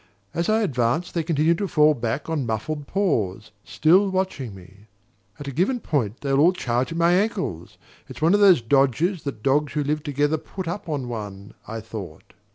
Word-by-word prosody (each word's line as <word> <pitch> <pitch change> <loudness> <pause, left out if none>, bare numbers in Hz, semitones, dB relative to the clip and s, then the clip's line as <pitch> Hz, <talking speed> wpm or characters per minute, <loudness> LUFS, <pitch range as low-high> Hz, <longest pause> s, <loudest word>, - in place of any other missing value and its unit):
As 170 +3 -1
I 220 +1 +3
advanced 130 - 0
they 170 - 0
continued 165 +1 +1
to 200 - -1
fall 150 -3 +4
back 120 +2 -3
on 155 -6 -2
muffled 140 +7 -3
paws, 110 - -1
still 185 +6 +3
watching 185 - -2
me. 95 +3 -16 0.5
"At 145 - -7
a - - -3
given 185 - 0
point, 120 - -2
they'll 140 -1 +1
all 170 +5 +5
charge 125 -4 -1
at 165 - -4
my 170 +1 +4
ankles: 190 - -1 0.3
it's - - -9
one 160 +4 +3
of 205 - +4
the 200 -3 +8
dodges 145 - +2
that 125 -7 -5
dogs 145 +2 +1
who 150 0 0
live 150 +2 -1
together 145 +1 0
put 190 +2 -7
up 175 +1 -5
on 140 -5 -2
one," 105 -4 -7
I 115 0 -5
thought. 100 -7 -9
145 Hz, 190 wpm, -23 LUFS, 120-170 Hz, 0.5 s, the